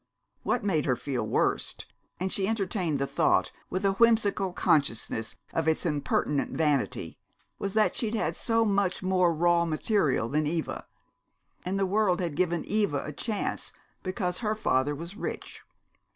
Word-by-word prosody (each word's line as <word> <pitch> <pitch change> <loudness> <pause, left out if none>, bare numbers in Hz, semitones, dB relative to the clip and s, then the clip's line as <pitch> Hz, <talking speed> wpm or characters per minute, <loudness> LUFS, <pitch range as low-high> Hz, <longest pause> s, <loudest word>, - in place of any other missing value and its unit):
What 245 - 0
made 170 -7 +1
her 125 - +2
feel 125 -4 -3
worst - - 0 0.3
and 185 +1 -1
she 195 -1 +1
entertained 190 -7 -1
the 140 - 0
thought - - +2 0.2
with 185 +2 -2
a 195 - +4
whimsical 205 -3 +3
consciousness 115 -9 0 0.2
of 165 -1 0
its 160 +2 +1
impertinent 145 -2 0
vanity 150 -4 0 0.4
was 195 0 -3
that 215 -1 +3
she'd 225 -1 -1
had 220 - -1
so 225 -1 +1
much 200 -3 +1
more 185 -2 +3
raw 170 +1 +3
material 155 - +1
than 150 +4 0
Eva! 165 +1 -3 0.8
And 185 +2 -2
the 195 - +2
world 190 -2 +2
had 175 -4 -2
given 175 +1 0
Eva 200 -10 0
a 150 - -5
chance 210 - -3 0.3
because 185 -1 -2
her 215 -2 0
father 145 -8 +1
was 170 +6 -7
rich. - - -6
180 Hz, 155 wpm, -28 LUFS, 150-200 Hz, 0.8 s, a